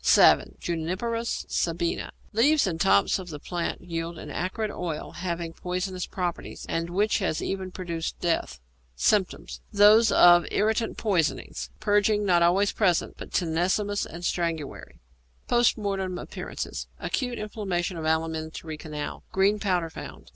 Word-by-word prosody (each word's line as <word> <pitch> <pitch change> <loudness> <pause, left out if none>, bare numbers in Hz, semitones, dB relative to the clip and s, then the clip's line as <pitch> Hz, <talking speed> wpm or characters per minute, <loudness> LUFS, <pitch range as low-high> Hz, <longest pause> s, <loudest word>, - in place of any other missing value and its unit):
=Savin= - - +5
(Juniperus 185 +8 -2
Sabina). 170 0 -1 0.2
Leaves 285 +7 +4
and 165 -4 -2
tops 100 - +4
of 185 -2 -8
the 150 - -6
plant 170 +3 -3
yield 165 -1 -4
an - - -8
acrid 210 +4 -2
oil 165 -6 -4
having 170 -1 -4
poisonous 180 +1 -3
properties, 180 -2 -4
and 165 +1 -2
which 205 +6 +1
has 185 -6 0
even 190 -1 -3
produced 170 -3 -4
death. 165 - -1 0.4
Symptoms. 190 - 0
Those 210 +2 +6
of 175 0 +7
irritant 220 +2 +1
poisons. 185 -8 -1
Purging 210 0 +2
not 175 -3 +4
always 190 +4 +4
present, 180 -6 +1
but - - -9
tenesmus 185 +5 0
and 170 +2 -9
strangury. 165 -5 -3 0.5
Post 240 0 +3
Mortem 195 -3 -2
Appearances. - - -6
Acute 245 -3 -2
inflammation 195 -4 -2
of 165 - -5
alimentary 160 0 -2
canal. 150 -1 -6
Green 200 +2 +3
powder 180 -5 0
found. - - -9
180 Hz, 135 wpm, -26 LUFS, 165-205 Hz, 0.5 s, of